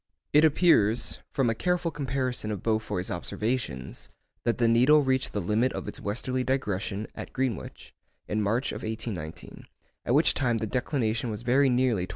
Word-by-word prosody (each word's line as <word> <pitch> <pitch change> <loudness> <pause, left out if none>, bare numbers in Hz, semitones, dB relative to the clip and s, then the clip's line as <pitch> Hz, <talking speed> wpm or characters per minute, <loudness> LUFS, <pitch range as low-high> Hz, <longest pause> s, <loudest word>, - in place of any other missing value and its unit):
It 150 +1 +6
appears, 145 - +3
from 135 -3 +1
a 115 - +2
careful 180 +6 0
comparison 130 -6 -2
of 105 -4 -4
Beaufoy's 110 -5 -1
observations, 90 - -3 0.4
that 120 - +1
the 120 -2 +3
needle 130 +6 +5
reached 130 -1 +1
the 105 - -2
limit 105 +7 +1
of - - -5
its - - -4
western 125 +5 -1
digression 105 -5 -2
(at - - -8
Greenwich) 130 -5 -4 0.3
in 105 +1 -1
March 115 +6 0
1819, 110 -8 -6 0.4
at 120 - +2
which 155 +3 +5
time 120 -4 +1
the 110 - -2
declination 120 -1 -1
was 110 +1 -5
very 130 +3 +4
nearly 120 -7 +1
25°. - - -29
120 Hz, 165 wpm, -27 LUFS, 105-130 Hz, 0.4 s, It